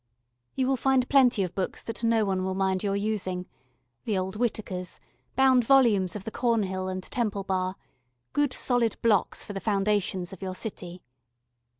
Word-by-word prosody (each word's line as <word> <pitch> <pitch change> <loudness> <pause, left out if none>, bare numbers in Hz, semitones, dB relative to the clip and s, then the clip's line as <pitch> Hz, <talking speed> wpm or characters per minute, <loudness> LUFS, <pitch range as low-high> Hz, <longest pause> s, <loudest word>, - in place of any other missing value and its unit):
You 260 - +1
will 265 0 +1
find 265 -1 +2
plenty 250 -7 +5
of 180 -1 -4
books 190 0 -3
that 230 +1 -5
nobody 215 -5 +2
will 190 0 -2
mind 190 -1 +1
your 200 -1 0
using 200 -3 -2 0.6
the 210 -3 0
old 190 0 -2
Whitakers, 210 -5 -2 0.4
bound 260 -2 +5
volumes 225 -8 +4
of 205 - -5
the 225 - -5
Cornhill 200 -7 0
and 185 0 -4
Temple 210 -4 -2
Bar 185 -1 -1 0.6
good 290 -2 +2
solid 245 -4 +1
blocks 215 -5 +2
for 205 - -7
the 195 - -3
foundations 195 -3 0
of 190 - -11
your 185 -1 -4
city. 180 -3 -6
205 Hz, 165 wpm, -27 LUFS, 185-235 Hz, 0.6 s, plenty